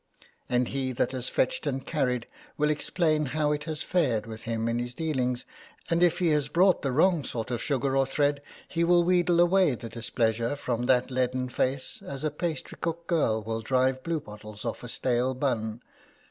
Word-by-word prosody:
And 125 -1 +1
he 130 -1 -2
that 120 - 0
has 130 -1 -3
fetched 130 - 0
and 135 -1 -2
carried 125 -6 0 0.3
will 150 0 +2
explain 155 0 +1
how 150 -1 +2
it 150 0 -2
has 155 -2 -3
fared 130 -12 +1
with 110 0 -8
him 115 0 -1
in 115 +1 0
his 120 0 -4
dealings, 130 -6 -1 0.5
and 170 +1 +2
if 175 -2 +4
he 175 -2 +2
has 150 -2 +2
brought 180 +5 +4
the 135 - -1
wrong 160 +3 +3
sort 115 -1 -4
of 120 - -2
sugar 135 -2 0
or 135 -1 +3
thread 145 +1 +1 0.3
he 170 -1 0
will 175 0 +5
wheedle 175 -1 +3
away 175 -4 +4
the 115 0 -8
displeasure 115 +1 -1
from 120 -4 -2
that 125 0 +3
leaden 125 0 0
face 130 +2 -1
as 140 +1 -6
a 155 - +1
pastrycook 165 +1 -4
girl 115 -11 +1
will 110 +1 -3
drive 130 +2 +1
bluebottles 105 -10 -5
off 115 - -4
a 120 - -6
stale 125 +1 0
bun. 120 -4 -1
130 Hz, 190 wpm, -28 LUFS, 120-155 Hz, 0.5 s, will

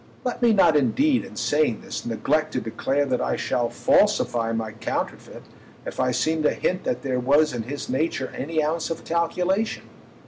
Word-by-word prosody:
Let 250 0 -3
me 240 -1 +5
not 195 -7 +5
indeed, 250 - +2
in 245 - -11
saying 145 -6 +1
this, - - -6
neglect 140 +8 0
to - - 0
declare 135 +5 -1
that 130 -2 -1
I - - 0
shall 120 -1 -1
falsify 115 0 +2
my 115 -1 -2
counterfeit 110 - -5 0.4
if - - -7
I 130 - +2
seem 155 +6 0
to 150 - +2
hint 185 +1 -1
that 255 - -2
there 130 -2 -1
was 145 +4 +3
in 120 - -2
his 140 +6 -6
nature 130 0 -1
any 155 +2 -1
ounce 160 +2 -1
of 165 - -5
calculation. 180 +5 0
150 Hz, 180 wpm, -24 LUFS, 125-170 Hz, 0.4 s, me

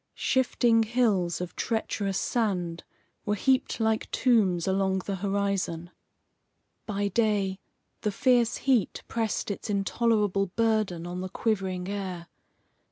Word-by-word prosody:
Shifting 240 -3 +2
hills 215 -7 +1
of 180 - -5
treacherous 205 -4 -1
sand 180 -8 -1 0.4
were 210 - 0
heaped 260 +5 +1
like 220 -1 0
tombs 200 -9 +2
along 190 -1 +1
the 195 -1 -2
horizon. 195 -3 -1 1.0
By 205 -1 -1
day, 200 -3 +1 0.4
the 210 - 0
fierce 240 +1 +2
heat 250 -8 +2
pressed 225 -2 -2
its 200 - -6
intolerable 205 -1 +1
burden 215 -7 +1
on 175 +1 -5
the 185 - -4
quivering 190 -4 -1
air. 190 -4 -4
200 Hz, 115 wpm, -27 LUFS, 185-225 Hz, 1.0 s, Shifting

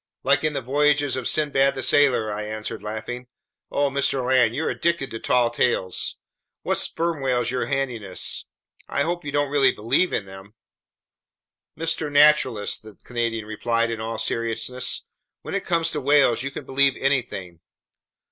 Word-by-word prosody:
"Like 140 +2 +3
in 155 -1 +1
the 135 - -3
voyages 145 +2 +2
of 130 -2 -2
Sinbad 140 -2 +2
the 130 - -4
Sailor," 125 -6 +3
I 105 - -4
answered, 110 0 -5
laughing. 110 +4 -6 0.4
"Oh, 140 -1 +1
Mr. 135 -2 0
Land, 125 -3 +3
you're 160 - -1
addicted 170 -5 -1
to 115 - -5
tall 120 -1 +2
tales! 105 -6 0 0.5
What - - +1
sperm 165 -3 -1
whales 125 -2 +1
you're 130 -1 -1
handing 135 -5 -2
us! 95 -2 -3 0.4
I 140 - +1
hope 175 +3 -2
you 145 - -4
don't 145 -1 0
really 140 -2 +4
believe 115 +12 +1
in 100 - -1
them!" 95 +2 -12 1.2
"Mr. 160 -2 -2
Naturalist," 145 -7 +4
the 110 -2 -13
Canadian 115 -2 -2
replied 115 +2 -1
in 115 -1 -4
all 110 0 -4
seriousness, 115 +3 -2 0.4
"when - - -6
it 200 -1 -2
comes 165 -2 +1
to 150 - -3
whales, 140 -4 +4
you 140 - -2
can 140 0 -8
believe 135 0 +2
anything! 120 -11 -1
130 Hz, 165 wpm, -23 LUFS, 115-145 Hz, 1.2 s, really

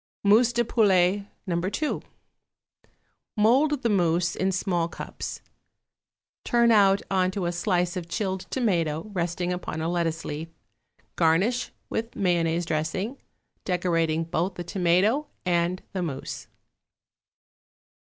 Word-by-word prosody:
=Mousse 220 +4 +5
de 240 0 +1
Poulet, 200 -3 +3 0.2
No. 175 -4 -1
2.= 200 - -1 1.4
Mould 270 +7 +3
the 235 - +2
mousse 175 -3 +2
in 190 +1 0
small 180 -2 0
cups; - - -7 1.0
turn 235 -1 +3
out 200 -2 +5
on 185 -1 +2
to 190 -1 -3
a 175 - 0
slice 175 0 0
of 175 -2 -5
chilled 190 -2 -2
tomato 175 - 0
resting 175 0 -1
upon 175 -3 -4
a 160 - -1
lettuce 165 -2 -1
leaf; 150 +2 -4 0.7
garnish 185 +10 +2 0.2
with 230 +1 -4
mayonnaise 170 -2 +1
dressing, 165 - -2 0.4
decorating 165 -3 +1
both 175 +3 -2
the 175 - -5
tomato 190 - +2 0.2
and 175 +1 0
the 190 - -2
mousse. 140 -6 -5
180 Hz, 120 wpm, -26 LUFS, 170-205 Hz, 1.4 s, =Mousse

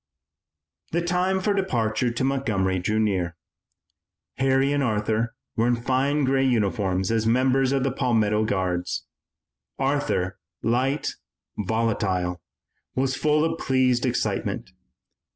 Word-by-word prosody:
The 170 +1 +1
time 180 +2 +1
for 205 +2 +1
departure 125 - 0
to 120 +2 -2
Montgomery 110 -9 0
drew 105 +5 -1
near. 95 -6 0 1.0
Harry 135 +1 +2
and 145 - +1
Arthur 110 -1 0 0.2
were 115 +1 +2
in 120 - +3
fine 135 +5 +1
gray 135 0 +2
uniforms 100 -6 +1
as 110 -1 +1
members 130 +2 +3
of 135 -1 +1
the 135 - +1
Palmetto 110 -4 +1
Guards. 90 -4 -1 0.7
Arthur, 135 -9 0 0.2
light, 130 +5 0 0.4
volatile, 95 -5 -1 0.5
was 135 0 +1
full 150 +1 +2
of 165 0 -2
pleased 130 -2 +2
excitement. - - -1
120 Hz, 115 wpm, -25 LUFS, 105-135 Hz, 1.0 s, in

